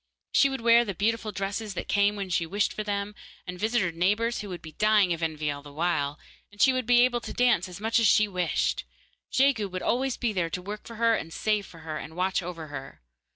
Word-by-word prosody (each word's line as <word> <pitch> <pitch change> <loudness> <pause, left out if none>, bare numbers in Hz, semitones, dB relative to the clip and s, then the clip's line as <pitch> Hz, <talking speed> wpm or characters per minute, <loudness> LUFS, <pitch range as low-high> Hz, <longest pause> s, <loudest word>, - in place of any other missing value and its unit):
She 275 - +5
would 270 -3 -4
wear 235 +1 +6
the 200 -5 -5
beautiful 220 +3 0
dresses 200 +1 -4
that - - -4
came 205 0 +2
when 195 -2 -5
she 170 -1 +1
wished 205 +4 0
for 215 - -4
them, 205 0 -3 0.3
and 180 -1 -7
visit 225 +2 +1
her 180 - -1
neighbours, 210 +8 0
who 205 - -7
would 180 -2 -7
be 160 - -9
dying 210 -2 +3
of 165 - -6
envy 155 -2 -1
all 145 0 -6
the 145 0 -12
while, 150 -2 -1 0.3
and 205 - -19
she 265 - +5
would 255 -2 -2
be 245 0 +6
able 245 -1 +1
to - - -7
dance 240 -8 +2
as 180 - -9
much 225 +2 +2
as 225 - +4
she 215 +1 +5
wished. 180 -4 0 0.5
Jegu 260 -6 +2
would 185 0 -5
always 260 +1 0
be 235 -3 -1
there 175 -4 0
to 180 - -3
work 205 +3 -7
for 230 - -9
her 230 +1 +3
and 165 -6 -3
save 210 +2 0
for 165 - -14
her, 155 -1 -5
and 160 - -9
watch 185 +2 0
over 170 -2 -6
her. 135 - -9
200 Hz, 245 wpm, -27 LUFS, 175-225 Hz, 0.5 s, wear